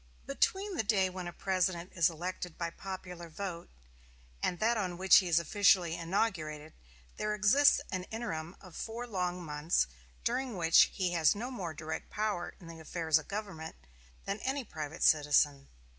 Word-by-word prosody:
Between 390 Hz, -, 0 dB
the -, -, +1 dB
day 195 Hz, -3 st, +2 dB
when 180 Hz, -1 st, -6 dB
a -, -, -5 dB
President 185 Hz, -1 st, -1 dB
is 170 Hz, -2 st, +4 dB
elected 175 Hz, +1 st, -5 dB
by 170 Hz, -1 st, -3 dB
popular 180 Hz, -2 st, -7 dB
vote 170 Hz, 0 st, -6 dB, 0.7 s
and 180 Hz, -, 0 dB
that 225 Hz, +6 st, +2 dB
on 185 Hz, -5 st, -2 dB
which 190 Hz, +1 st, +7 dB
he 185 Hz, -, +3 dB
is 170 Hz, -2 st, +3 dB
officially 175 Hz, -1 st, +3 dB
inaugurated 165 Hz, -4 st, -2 dB, 0.4 s
there 210 Hz, 0 st, -1 dB
exists 220 Hz, +8 st, +5 dB
an 185 Hz, -1 st, -3 dB
interim 175 Hz, -8 st, -5 dB
of 185 Hz, -4 st, -14 dB
four 230 Hz, +2 st, -5 dB
long 180 Hz, -5 st, -2 dB
months, 150 Hz, -, +1 dB, 0.4 s
during 250 Hz, -2 st, -1 dB
which 165 Hz, -1 st, +6 dB
he 185 Hz, -3 st, -1 dB
has 165 Hz, -1 st, +3 dB
no 240 Hz, +5 st, -4 dB
more 180 Hz, -10 st, -5 dB
direct 160 Hz, +1 st, -5 dB
power 210 Hz, -5 st, -2 dB
in 175 Hz, -, -14 dB
the 165 Hz, -1 st, -10 dB
affairs 160 Hz, -1 st, +1 dB
of 155 Hz, -, -12 dB
government 195 Hz, -6 st, -5 dB, 0.5 s
than 200 Hz, +2 st, -3 dB
any 270 Hz, +3 st, -2 dB
private 155 Hz, -8 st, -6 dB
citizen. 145 Hz, -2 st, +4 dB
180 Hz, 165 wpm, -32 LUFS, 165-205 Hz, 0.7 s, which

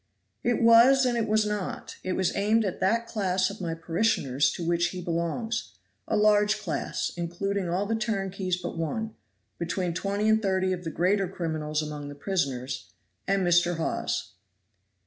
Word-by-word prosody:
"It 240 Hz, -1 st, +1 dB
was 240 Hz, +4 st, +7 dB
and 245 Hz, -1 st, +1 dB
it 230 Hz, -1 st, 0 dB
was 215 Hz, 0 st, +3 dB
not. 210 Hz, -2 st, -4 dB
It 185 Hz, -, -1 dB
was 185 Hz, -1 st, 0 dB
aimed 215 Hz, +2 st, +2 dB
at 190 Hz, -, -3 dB
that 230 Hz, +5 st, +2 dB
class 190 Hz, -4 st, 0 dB
of 200 Hz, -, -10 dB
my 165 Hz, -2 st, -2 dB
parishioners 160 Hz, -, +1 dB
to 170 Hz, -, -5 dB
which 170 Hz, +1 st, +2 dB
he 185 Hz, -, -6 dB
belongs; 170 Hz, -, -2 dB, 0.3 s
a 215 Hz, -, +1 dB
large 210 Hz, 0 st, +4 dB
class, 185 Hz, -7 st, -2 dB
including 180 Hz, +2 st, -2 dB
all 185 Hz, +4 st, 0 dB
the 220 Hz, -, -1 dB
turnkeys 195 Hz, -4 st, -1 dB
but 175 Hz, -2 st, -5 dB
one, 220 Hz, +7 st, -2 dB, 0.5 s
between 175 Hz, +1 st, -1 dB
twenty 200 Hz, +4 st, -1 dB
and 220 Hz, 0 st, +4 dB
thirty 190 Hz, -2 st, +1 dB
of 180 Hz, -1 st, -5 dB
the -, -, -1 dB
greater 185 Hz, +4 st, +1 dB
criminals 155 Hz, -4 st, -2 dB
among 150 Hz, -1 st, -6 dB
the 145 Hz, -, -8 dB
prisoners 135 Hz, -7 st, -2 dB, 0.4 s
and 195 Hz, -1 st, +2 dB
Mr. 175 Hz, 0 st, +3 dB
Hawes." 165 Hz, -, -2 dB
185 Hz, 165 wpm, -27 LUFS, 170-210 Hz, 0.5 s, was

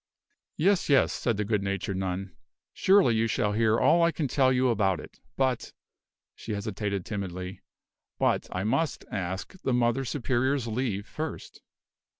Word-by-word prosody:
"Yes, 190 Hz, +2 st, +2 dB
yes," 140 Hz, -2 st, +4 dB
said 115 Hz, -4 st, -1 dB
the 105 Hz, -, -1 dB
good 105 Hz, -1 st, 0 dB
natured 100 Hz, -1 st, -2 dB
nun; 95 Hz, 0 st, -3 dB, 0.4 s
"surely 190 Hz, -, +4 dB
you 110 Hz, +1 st, +2 dB
shall 105 Hz, -2 st, 0 dB
hear 110 Hz, +1 st, +3 dB
all 170 Hz, -, +4 dB
I 170 Hz, 0 st, +4 dB
can 155 Hz, -3 st, -2 dB
tell 130 Hz, 0 st, +3 dB
you 130 Hz, 0 st, +3 dB
about 100 Hz, -6 st, +1 dB
it; -, -, -12 dB, 0.2 s
but 130 Hz, -3 st, 0 dB, 0.3 s
" -, -, -65 dB
she 110 Hz, -, -6 dB
hesitated 100 Hz, -2 st, -3 dB
timidly, 95 Hz, -3 st, -5 dB, 0.6 s
"but -, -, +1 dB
I 90 Hz, -, -2 dB
must 135 Hz, +6 st, 0 dB
ask 95 Hz, -1 st, -4 dB
the 130 Hz, -, 0 dB
Mother 120 Hz, +2 st, +2 dB
Superior's 130 Hz, 0 st, 0 dB
leave 110 Hz, -3 st, -2 dB
first." 155 Hz, 0 st, -6 dB
115 Hz, 155 wpm, -28 LUFS, 100-130 Hz, 0.6 s, yes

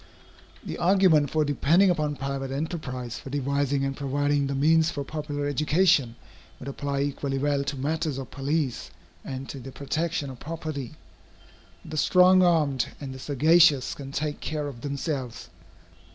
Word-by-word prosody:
The -, -, -5 dB
argument 175 Hz, -5 st, +4 dB
for 155 Hz, +1 st, +1 dB
depending 165 Hz, +7 st, +3 dB
upon 150 Hz, -3 st, -1 dB
private 135 Hz, -1 st, -4 dB
enterprise 135 Hz, -5 st, -4 dB
for -, -, -9 dB
devising 140 Hz, 0 st, 0 dB
and 135 Hz, 0 st, -2 dB
providing 145 Hz, +1 st, 0 dB
the 140 Hz, -, -2 dB
means 160 Hz, +3 st, +4 dB
for 145 Hz, -, -4 dB
popular 145 Hz, 0 st, -4 dB
education, 150 Hz, -3 st, +2 dB, 0.4 s
would 125 Hz, -, -10 dB
apply 140 Hz, 0 st, -2 dB
equally 140 Hz, -1 st, -2 dB
well 140 Hz, 0 st, +1 dB
to 140 Hz, +1 st, -3 dB
matters 155 Hz, +1 st, -1 dB
of 135 Hz, -, -7 dB
police, 140 Hz, -1 st, -2 dB, 0.3 s
and 130 Hz, 0 st, -6 dB
to 140 Hz, -, -6 dB
the 130 Hz, +1 st, -9 dB
protection 145 Hz, +2 st, -2 dB
of 125 Hz, -, -12 dB
property. 155 Hz, -5 st, -6 dB, 0.9 s
The 155 Hz, -, -6 dB
strong 185 Hz, +3 st, +5 dB
armed 155 Hz, -7 st, +2 dB
and 135 Hz, -2 st, -6 dB
the 130 Hz, -, -9 dB
sagacious 150 Hz, +1 st, +4 dB
can 135 Hz, -1 st, -8 dB
take 145 Hz, +1 st, -3 dB
care 150 Hz, -2 st, -3 dB
of 125 Hz, -5 st, -8 dB
themselves. 135 Hz, -, -4 dB
145 Hz, 150 wpm, -26 LUFS, 135-155 Hz, 0.9 s, strong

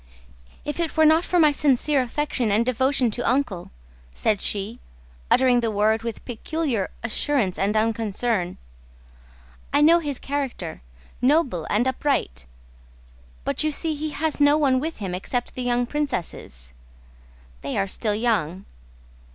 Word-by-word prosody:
"If 295 Hz, +3 st, -4 dB
it 335 Hz, -1 st, -2 dB
were 315 Hz, -, +6 dB
not 315 Hz, +2 st, +5 dB
for 360 Hz, -, 0 dB
my 310 Hz, -3 st, +6 dB
sincere 285 Hz, 0 st, +2 dB
affection 255 Hz, -2 st, -1 dB
and 215 Hz, +3 st, +2 dB
devotion 255 Hz, 0 st, +2 dB
to 240 Hz, -, -3 dB
Uncle," 245 Hz, -10 st, -1 dB, 0.5 s
said 210 Hz, -, 0 dB
she, 210 Hz, +4 st, -1 dB, 0.5 s
uttering 255 Hz, -1 st, +4 dB
the 230 Hz, -1 st, 0 dB
word 215 Hz, +1 st, +2 dB
with 230 Hz, -1 st, -6 dB
peculiar 250 Hz, -, -2 dB
assurance 240 Hz, -4 st, 0 dB
and 205 Hz, +3 st, +1 dB
unconcern, 220 Hz, -3 st, 0 dB, 1.1 s
"I 290 Hz, -, +3 dB
know 330 Hz, +3 st, +6 dB
his 290 Hz, -5 st, -3 dB
character: 270 Hz, -, -4 dB, 0.4 s
noble, 255 Hz, -, +2 dB
upright... 230 Hz, -, 0 dB, 1.0 s
but -, -, -1 dB
you 310 Hz, -, +1 dB
see 315 Hz, +2 st, 0 dB
he 305 Hz, +1 st, -3 dB
has 310 Hz, +1 st, -2 dB
no 290 Hz, +1 st, +5 dB
one 270 Hz, -4 st, +3 dB
with 320 Hz, +4 st, -4 dB
him 195 Hz, -4 st, -4 dB
except 245 Hz, +7 st, -3 dB
the 255 Hz, -, -5 dB
young 245 Hz, 0 st, +1 dB
princesses.... 170 Hz, -, -4 dB, 0.9 s
They -, -, -3 dB
are 195 Hz, -, +2 dB
still 205 Hz, +2 st, -1 dB
young...." 200 Hz, -6 st, 0 dB
245 Hz, 140 wpm, -24 LUFS, 210-290 Hz, 1.1 s, were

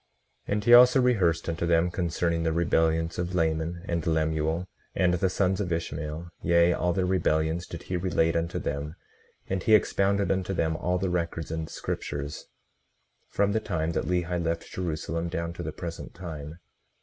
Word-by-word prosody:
18:38 -, -, 0 dB
And 105 Hz, 0 st, -1 dB
he 120 Hz, -, +5 dB
also 125 Hz, +2 st, +8 dB
rehearsed 95 Hz, -10 st, +2 dB
unto 85 Hz, 0 st, -1 dB
them 85 Hz, +1 st, +3 dB
concerning 85 Hz, -1 st, -1 dB
the 80 Hz, -1 st, +1 dB
rebellions 80 Hz, 0 st, +1 dB
of 90 Hz, +1 st, -2 dB
Laman 80 Hz, +1 st, 0 dB
and 85 Hz, -2 st, -2 dB
Lemuel, 80 Hz, +1 st, 0 dB, 0.3 s
and 90 Hz, -1 st, +3 dB
the 90 Hz, +2 st, +1 dB
sons 95 Hz, +1 st, +1 dB
of 90 Hz, -3 st, -3 dB
Ishmael, 80 Hz, 0 st, -3 dB
yea, 85 Hz, 0 st, +4 dB
all 90 Hz, 0 st, 0 dB
their 90 Hz, +1 st, 0 dB
rebellions 85 Hz, -2 st, +1 dB
did 85 Hz, -, -8 dB
he 90 Hz, -, -2 dB
relate 85 Hz, -2 st, +1 dB
unto 85 Hz, 0 st, -1 dB
them; 70 Hz, +3 st, -3 dB, 0.5 s
and 95 Hz, -1 st, -1 dB
he 110 Hz, +4 st, +5 dB
expounded 100 Hz, -1 st, +2 dB
unto 95 Hz, 0 st, -1 dB
them 80 Hz, -2 st, 0 dB
all 90 Hz, +2 st, 0 dB
the 95 Hz, 0 st, -1 dB
records 85 Hz, -2 st, -2 dB
and 80 Hz, -1 st, -3 dB
scriptures 75 Hz, 0 st, -5 dB, 0.8 s
from 100 Hz, 0 st, +1 dB
the 110 Hz, -, +1 dB
time 85 Hz, -6 st, -2 dB
that -, -, -1 dB
Lehi 90 Hz, -1 st, -1 dB
left 85 Hz, 0 st, -3 dB
Jerusalem 85 Hz, -1 st, -3 dB
down 85 Hz, -1 st, -3 dB
to -, -, -7 dB
the -, -, -4 dB
present 85 Hz, -1 st, -7 dB
time. 80 Hz, -4 st, -7 dB
85 Hz, 175 wpm, -27 LUFS, 80-90 Hz, 0.8 s, also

